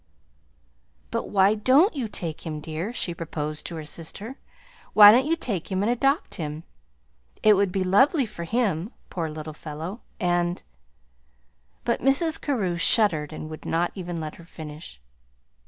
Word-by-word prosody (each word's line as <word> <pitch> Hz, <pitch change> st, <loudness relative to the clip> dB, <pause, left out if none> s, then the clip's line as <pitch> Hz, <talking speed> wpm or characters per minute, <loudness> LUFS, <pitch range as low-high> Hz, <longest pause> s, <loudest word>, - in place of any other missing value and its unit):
"But -, -, -3 dB
why 195 Hz, 0 st, +4 dB
don't 265 Hz, -, +4 dB
you 255 Hz, -5 st, -2 dB
take 165 Hz, -6 st, -5 dB
him, 155 Hz, -2 st, -5 dB
dear?" 160 Hz, +7 st, -4 dB
she 185 Hz, -7 st, -2 dB
proposed 155 Hz, -2 st, -4 dB
to 170 Hz, -, -6 dB
her 155 Hz, -1 st, -6 dB
sister. 195 Hz, -, -6 dB, 0.5 s
"Why 205 Hz, -1 st, +10 dB
don't 255 Hz, +5 st, +3 dB
you 330 Hz, -, +2 dB
take 205 Hz, -, -4 dB
him 190 Hz, +1 st, 0 dB
and 225 Hz, -, +2 dB
adopt 275 Hz, +5 st, +1 dB
him? 155 Hz, +1 st, -5 dB, 0.8 s
It 215 Hz, -, +7 dB
would 200 Hz, -2 st, +2 dB
be 190 Hz, 0 st, 0 dB
lovely 265 Hz, -, +4 dB
for 205 Hz, -6 st, -8 dB
him 205 Hz, -3 st, -1 dB, 0.2 s
poor 165 Hz, -3 st, -3 dB
little 155 Hz, 0 st, -7 dB
fellow 160 Hz, +8 st, -7 dB, 0.2 s
and 175 Hz, 0 st, 0 dB, 0.6 s
" -, -, -41 dB
But 235 Hz, -, 0 dB
Mrs. 300 Hz, +5 st, +2 dB
Carew 200 Hz, -, -1 dB
shuddered 170 Hz, -5 st, +4 dB
and 155 Hz, 0 st, -7 dB
would 155 Hz, -, -9 dB
not 170 Hz, +2 st, 0 dB
even 175 Hz, -3 st, -5 dB
let 155 Hz, -1 st, -6 dB
her 170 Hz, -, -13 dB
finish. 155 Hz, -, -10 dB
180 Hz, 160 wpm, -25 LUFS, 155-225 Hz, 0.8 s, Why